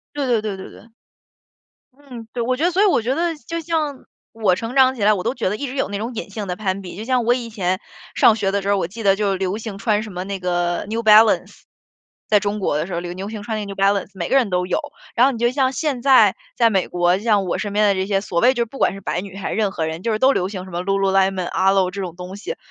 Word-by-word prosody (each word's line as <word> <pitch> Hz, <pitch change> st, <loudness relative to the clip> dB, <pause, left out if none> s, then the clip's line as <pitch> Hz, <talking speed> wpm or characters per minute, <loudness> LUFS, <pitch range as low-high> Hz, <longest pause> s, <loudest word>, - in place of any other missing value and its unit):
对 285 Hz, -2 st, -1 dB
对 235 Hz, -3 st, +2 dB
对 210 Hz, -2 st, -4 dB
对 190 Hz, -, -9 dB
对。 -, -, -14 dB, 1.2 s
嗯， 255 Hz, -5 st, -11 dB
对， 240 Hz, -, -2 dB
我 255 Hz, +2 st, 0 dB
觉 305 Hz, -, -1 dB
得 350 Hz, -, +3 dB
所 380 Hz, +4 st, +3 dB
以 -, -, +5 dB
我 370 Hz, -, +3 dB
觉 250 Hz, +4 st, 0 dB
得 335 Hz, +2 st, 0 dB
就 330 Hz, +5 st, -5 dB
像 310 Hz, -4 st, -2 dB, 0.3 s
我 215 Hz, -5 st, +2 dB
成 230 Hz, +5 st, -5 dB
长 260 Hz, -1 st, +5 dB
起 225 Hz, -, -5 dB
来， 215 Hz, -, +6 dB
我 190 Hz, -, -1 dB
都 230 Hz, -, 0 dB
觉 240 Hz, -, -1 dB
得 210 Hz, -, -2 dB
一 285 Hz, -, -4 dB
直 260 Hz, +1 st, -6 dB
有 270 Hz, -, 0 dB
那 200 Hz, 0 st, -4 dB
种 230 Hz, +4 st, -4 dB
隐 225 Hz, -, -5 dB
性 205 Hz, 0 st, -5 dB
的 180 Hz, -, -3 dB
攀 195 Hz, -2 st, -2 dB
比。 180 Hz, -2 st, -9 dB
就 210 Hz, -, -6 dB
像 250 Hz, -1 st, +1 dB
我 240 Hz, -, +4 dB
以 245 Hz, -2 st, -4 dB
前 185 Hz, -4 st, -2 dB, 0.4 s
上 225 Hz, -, +6 dB
学 205 Hz, -3 st, -1 dB
的 200 Hz, +1 st, 0 dB
时 200 Hz, -, -4 dB
候， 200 Hz, -, +3 dB
我 190 Hz, -, -1 dB
记 220 Hz, +5 st, -8 dB
得 195 Hz, -2 st, +4 dB
就 200 Hz, -1 st, 0 dB
流 190 Hz, +1 st, -2 dB
行 220 Hz, -3 st, -7 dB
穿 210 Hz, 0 st, +1 dB
什 220 Hz, -, -8 dB
么 180 Hz, +1 st, -5 dB
那 195 Hz, 0 st, -4 dB
个 175 Hz, -1 st, -1 dB
New 225 Hz, +1 st, -2 dB
Balance。 220 Hz, 0 st, +4 dB, 0.6 s
在 210 Hz, -1 st, +4 dB
中 205 Hz, +1 st, -2 dB
国 190 Hz, -7 st, 0 dB
的 155 Hz, -, -2 dB
时 185 Hz, -, -6 dB
候， 170 Hz, -, -1 dB
流 175 Hz, 0 st, -6 dB
流行 205 Hz, +3 st, -6 dB
穿 220 Hz, +1 st, -3 dB
那 210 Hz, -, -3 dB
个 200 Hz, -, -8 dB
New 195 Hz, -, -7 dB
Balance， 195 Hz, 0 st, +1 dB
每 175 Hz, -3 st, -4 dB
个 -, -, +4 dB
人 255 Hz, -5 st, +3 dB
都 180 Hz, 0 st, 0 dB
有。 -, -, 0 dB, 0.4 s
然 245 Hz, -, +5 dB
后 275 Hz, -, +3 dB
你 235 Hz, -, -6 dB
就 240 Hz, +1 st, +2 dB
像 260 Hz, -1 st, +2 dB
现 280 Hz, -3 st, -2 dB
在 270 Hz, -1 st, +6 dB, 0.2 s
在 230 Hz, -1 st, +4 dB
美 190 Hz, -3 st, 0 dB
国， 175 Hz, 0 st, +2 dB
就 -, -, -11 dB
像 210 Hz, -4 st, +2 dB
我 180 Hz, -, -2 dB
身 205 Hz, -, -3 dB
边 210 Hz, +1 st, +3 dB
的 200 Hz, -, +4 dB
这 190 Hz, 0 st, -1 dB
些 195 Hz, -1 st, +1 dB
所 175 Hz, -4 st, -2 dB
谓 255 Hz, +6 st, +5 dB
就 240 Hz, -, 0 dB
是 -, -, +1 dB
不 235 Hz, +4 st, -12 dB
管 -, -, +2 dB
是 195 Hz, -, -9 dB
白 175 Hz, -, -2 dB
女 195 Hz, 0 st, -10 dB
还 195 Hz, -, -4 dB
是 -, -, -3 dB
任 210 Hz, -3 st, +1 dB
何 160 Hz, -4 st, -3 dB
人， 160 Hz, +2 st, -5 dB
就 230 Hz, -, -1 dB
是 215 Hz, -, 0 dB
都 265 Hz, +3 st, +5 dB
流 185 Hz, -7 st, 0 dB
行 190 Hz, -2 st, -6 dB
什 190 Hz, -, -11 dB
么 175 Hz, 0 st, -3 dB
Lululemon，Alo 195 Hz, -1 st, +2 dB
这 200 Hz, -, -5 dB
种 175 Hz, -3 st, -5 dB
东 180 Hz, +1 st, -8 dB
西， 345 Hz, -, -6 dB
205 Hz, 395 characters per minute, -21 LUFS, 190-235 Hz, 1.2 s, 来